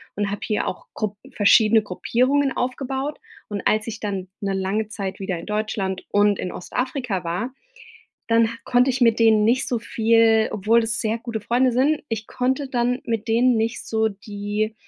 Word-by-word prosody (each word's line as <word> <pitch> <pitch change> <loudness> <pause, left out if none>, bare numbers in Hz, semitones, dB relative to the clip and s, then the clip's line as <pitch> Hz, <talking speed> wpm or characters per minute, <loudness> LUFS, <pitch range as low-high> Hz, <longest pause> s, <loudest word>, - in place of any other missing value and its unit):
und 205 -1 -1
habe 205 - -4
hier 210 - -1
auch - - -5
Grupp 210 -2 -3
verschiedene 215 +1 +5
Gruppierungen 255 +8 +1
aufgebaut. 265 +3 -3 0.3
Und, 205 -1 -5
als 215 +1 +1
ich 225 -1 -5
dann 195 -3 -4 0.2
'ne 195 -1 0
lange 195 +3 -1
Zeit 195 -3 -5
wieder 190 -3 -3
in - - -9
Deutschland 210 -3 -2
und 205 -1 +3
in 180 - -3
Ostafrika 245 -2 -3
war, 210 +10 -3 0.7
dann 230 0 +4
h 230 - -7
konnte 250 +2 +3
ich 255 +1 -2
mit 230 -1 +4
denen 220 -2 +5
nicht 255 +3 +2
so 245 -3 0
viel 225 -1 +3
obwohl 220 +3 +3
es 225 0 -2
sehr 225 +1 -1
gute 230 -2 -5
Freunde 245 +3 +2
sind, 280 +5 +2
ich 220 -1 -4
konnte 260 +2 -1
dann 250 +1 0
mit 225 -1 -3
denen 240 +2 +3
nicht 225 +1 -2
so 220 0 +1
die 205 +1 -4
225 Hz, 180 wpm, -23 LUFS, 205-245 Hz, 0.7 s, verschiedene